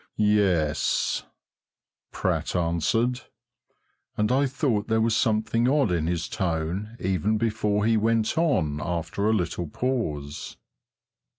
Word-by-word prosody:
"Yes," 100 -8 +1 0.9
Pratt - - -1
answered, 90 +9 +1 1.0
and 105 +2 +1
I 135 +2 +3
thought 125 -6 -1
there 110 -1 +2
was 110 0 +2
something 110 +2 +1
odd 140 -7 +2
in 80 -2 0
his 85 -1 -1
tone 90 +5 -3
even 95 +4 0
before 105 -2 0
he 115 0 +3
went 110 0 +1
on 85 - +1
after 85 +5 -1
a - - +3
little 90 -4 -1
pause. 75 - -3
105 Hz, 115 wpm, -25 LUFS, 85-115 Hz, 1.0 s, I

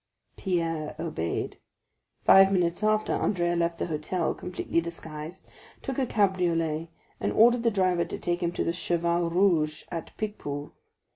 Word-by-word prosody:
Pierre 165 -5 -2
obeyed. 150 - -3 0.7
Five 195 0 +8
minutes 175 -1 +1
after, 215 0 +2
Andrea 175 -3 +1
left 170 0 0
the - - -2
hotel, 160 +2 -1
completely 180 -1 -2
disguised, 165 0 -8 0.4
took 270 0 -3
a 260 - +1
cabriolet, 170 -6 +1 0.3
and - - -1
ordered 235 +2 +5
the 230 - +3
driver 185 -4 +1
to - - -6
take 175 0 -2
him 170 -1 0
to - - -1
the 170 - 0
Cheval 170 -1 0
Rouge, 165 -4 +2
at 165 -2 -6
Picpus. 145 -9 -4
175 Hz, 145 wpm, -27 LUFS, 165-190 Hz, 0.7 s, Five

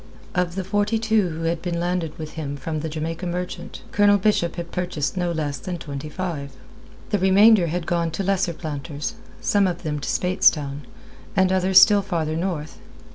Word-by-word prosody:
Of 180 -1 0
the 190 - -2
forty 205 +4 +1
two 220 -4 +2
who 165 0 -5
had 165 0 -1
been 175 -1 -2
landed 175 -2 -2
with 155 -1 -6
him 145 -3 -5
from 155 +3 -4
the 160 +1 -4
Jamaica 165 +3 -4
Merchant, 180 +1 -5
Colonel 205 0 +5
Bishop 190 -4 +1
had 170 -1 -6
purchased 175 -4 -2
no 175 -2 0
less 150 -3 -2
than 185 -2 -5
twenty 145 -1 -6
five. 150 -5 -4 0.6
The 205 - +2
remainder 195 0 +6
had 170 +1 -2
gone 170 -1 0
to 195 - -2
lesser 190 -2 +1
planters, 150 -2 -5 0.3
some 200 -2 +3
of 175 -1 -4
them 150 -2 -2
to 135 - -4
Speightstown, 150 -6 +2 0.5
and 190 -1 +3
others 190 0 +6
still 205 +1 +6
farther 165 -5 -2
north. 165 -3 -3
175 Hz, 185 wpm, -23 LUFS, 155-190 Hz, 0.6 s, remainder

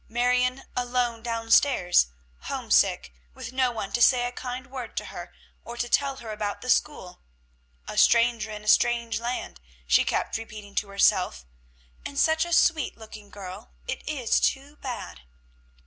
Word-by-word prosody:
Marion 250 +2 +1
alone 245 -2 -1
down 230 -1 -4
stairs, 180 - +4 0.4
homesick, - - +1 0.2
with - - -8
no 255 -1 +2
one 220 -4 -5
to 240 - -1
say 245 0 +5
a 245 - -3
kind 250 0 -6
word 255 -3 -8
to - - -2
her, - - -8 0.3
or 235 - -8
to 240 - -1
tell 275 +2 +1
her 235 -4 -8
about 210 -1 -4
the 255 - 0
school, 185 -12 -1 0.7
"a - - -1
stranger 235 -1 +4
in 210 -1 -7
a - - -12
strange 235 0 +3
land," 235 - -4 0.2
she - - +4
kept - - -1
repeating 215 -2 -10
to 205 - -1
herself; 65 - +2 0.6
"and 280 - -7
such 320 +2 +3
a 345 - -7
sweet 320 -4 +2
looking 215 -2 -12
girl. 200 +2 -10
It's 265 -3 -1
too 280 +2 -1
bad!" 245 - -7
240 Hz, 160 wpm, -26 LUFS, 215-255 Hz, 0.7 s, say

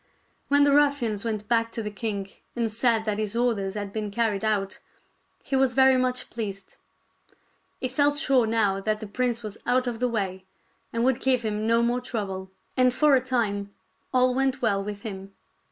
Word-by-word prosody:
When 285 0 +5
the 285 -1 +4
ruffians 280 -8 +2
went 215 -2 -3
back 230 0 +1
to 225 - -3
the 210 - -4
king 200 -2 -4 0.2
and 230 -2 -1
said 225 0 +2
that 210 -1 -1
his 215 0 -2
orders 220 -5 0
had 205 -1 -5
been 215 -1 -3
carried 215 -1 0
out, 205 -3 -1 0.6
he 270 - -2
was 265 -2 +3
very 265 0 +6
much 255 0 -1
pleased. 200 -4 -6 1.0
He 255 - -1
felt 285 +3 +2
sure 265 -6 +3
now 210 -3 +2
that 215 +2 -1
the 215 - -6
prince 240 +2 -2
was 215 -1 -7
out 250 +1 +2
of 240 -2 -3
the 250 0 +1
way 190 -5 -3 0.5
and 230 +1 0
would 260 -2 +2
give 255 -2 +2
him 215 0 -2
no 230 +1 +3
more 240 +1 +1
trouble; 195 -6 -4 0.3
and 255 -1 +4
for 290 +2 +4
a 260 - +3
time 205 -6 -1 0.4
all 255 0 +3
went 270 +1 +1
well 200 -5 +1
with 205 0 -6
him. 195 -2 -7
230 Hz, 190 wpm, -26 LUFS, 205-255 Hz, 1.0 s, very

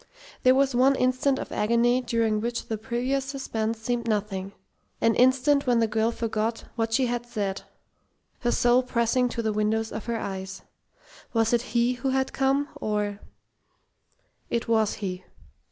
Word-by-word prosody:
There 255 0 +5
was 275 0 +2
one 260 +3 +4
instant 255 +2 +1
of - - -6
agony 235 +3 +2
during 230 -3 0
which 235 +1 -3
the 220 - -2
previous 250 +5 -1
suspense 230 -5 -3
seemed 235 +1 -2
nothing 200 -3 -2 0.5
an 230 - +3
instant 260 +3 +3
when 245 -1 +4
the 230 - +3
girl 220 +1 +1
forgot 225 0 -2
what 225 -1 -1
she 255 +3 +2
had 240 -1 -2
said, 200 -4 -3 0.8
her 240 - 0
soul 245 +1 +4
pressing 250 0 +1
to 230 0 -3
the 220 -1 0
windows 220 +1 0
of 215 - -6
her 235 -1 -1
eyes. 190 -2 -6 0.7
Was 225 0 +2
it 240 - +3 0.2
he 240 +1 +3
who 255 +2 -2
had 265 0 0
come, 275 +2 +1
or 210 -1 -2 1.3
It 235 - -1
was 220 -2 +2
he. 180 0 -4
235 Hz, 160 wpm, -26 LUFS, 220-255 Hz, 1.3 s, There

